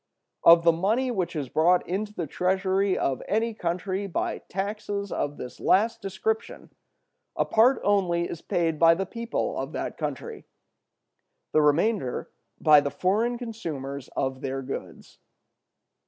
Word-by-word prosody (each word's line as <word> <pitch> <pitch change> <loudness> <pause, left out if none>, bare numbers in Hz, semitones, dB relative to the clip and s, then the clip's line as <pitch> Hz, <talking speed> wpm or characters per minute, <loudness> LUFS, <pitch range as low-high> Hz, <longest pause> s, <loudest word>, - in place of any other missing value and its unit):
Of 170 0 +8
the 170 - +6
money 215 +10 0
which 185 -7 -2
is 145 -4 -2
brought 175 +6 +3
into 205 +4 -2
the 175 -5 -4
treasury 190 +4 +1
of 130 -2 -1
any 225 +2 0
country 185 +1 -2
by 185 - -2
taxes 200 +1 -4
of 145 0 -2
this 125 - -8
last 220 +5 +2
description, 200 +3 -3 0.6
a - - +1
part 240 +4 +4
only 180 -4 +2
is 170 - -7
paid 165 -3 -1
by 165 0 +6
the 195 +2 -2
people 230 +4 -3
of - - -5
that - - -4
country; 460 -2 -5 1.1
the 155 - +4
remainder 150 - +1 0.3
by 150 -1 +7
the 140 - -2
foreign 220 +10 0
consumers 150 - -6
of 130 -1 -1
their 135 0 -3
goods. 135 - -8
185 Hz, 140 wpm, -26 LUFS, 160-210 Hz, 1.1 s, Of